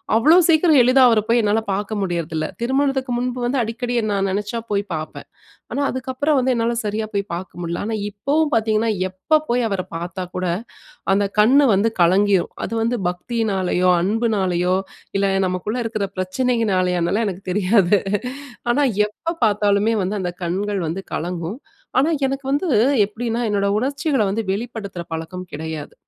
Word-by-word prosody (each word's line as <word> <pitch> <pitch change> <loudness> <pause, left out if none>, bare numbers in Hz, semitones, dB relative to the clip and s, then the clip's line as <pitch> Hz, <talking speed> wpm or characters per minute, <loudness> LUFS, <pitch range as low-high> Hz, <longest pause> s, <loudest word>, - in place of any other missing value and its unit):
அவ்ளோ 300 +10 +6
சீக்கிரம் 315 -2 +5
எளிதா 255 +2 +5
அவர 225 -2 +3
போய் 235 +1 +4
என்னால 210 +2 +2
பாக்க 205 +2 -3
முடியுறதுல்ல, 165 -4 -2 0.2
திருமணத்துக்கு 265 0 0
முன்பு 250 0 -2
வந்து 255 +2 0
அடிக்கடி 240 +2 -3 0.2
நான் 195 -1 0
நினைச்சா 210 +4 -2
போய் 200 0 +1
பார்ப்பேன். 155 0 -7 0.5
ஆனா, - - -1
அதுக்கப்புறம் 260 +3 0
வந்து 255 0 +1
என்னால 235 +1 0
சரியா 215 +1 -2
போய் 200 0 0
பாக்க 175 0 -7
முடில. 170 0 -3
ஆனா, 220 0 -2
இப்பவும் 290 +9 0
பாத்தீங்கன்னா, 220 0 +2 0.2
எப்ப 190 +12 +1
போய் 245 0 +2
அவர 195 -2 -1
பாத்தாக்கூட 180 +1 -4 0.7
அந்த 200 +1 +2 0.2
கண்ணு 270 +7 +5
வந்து 215 +4 +2
கலங்கிரும். 190 +2 +3
அது - - -6
வந்து 240 +2 0
பக்தியினாலேயோ! 185 -2 0
அன்புனாலயோ! 190 -3 +1 0.4
இல்ல 195 0 +2 0.2
நமக்குள்ள 185 +6 -2
இருக்குற 215 -3 -2
பிரச்சனையினாலயோனாலாம் 185 -3 0
அதெல்லாம் 215 +5 0
எனக்கு 190 +1 -8
தெரியாது 200 0 +3 0.7
ஆனா, 275 +5 +2 0.4
எப்ப 335 0 -1
பாத்தாலுமே 210 0 +2
வந்து 190 +3 -2
அந்த 180 -2 -2
கண்கள் 195 +4 -1
வந்து 170 +5 -3
கலங்கும். 175 +4 -3 0.4
ஆனா, 275 +5 +4 0.2
எனக்கு 270 0 -3
வந்து 290 +6 0 0.4
எப்பிடின்னா 230 +3 -3
என்னோட 200 -1 +1
உணர்ச்சிகள்ல 275 -1 0
வந்து 220 +3 -1
வெளிப்படுத்துற 205 -3 -5
பழக்கம் 170 +3 -5
கிடையாது. 155 0 -6
210 Hz, 145 wpm, -21 LUFS, 185-245 Hz, 0.7 s, அவ்ளோ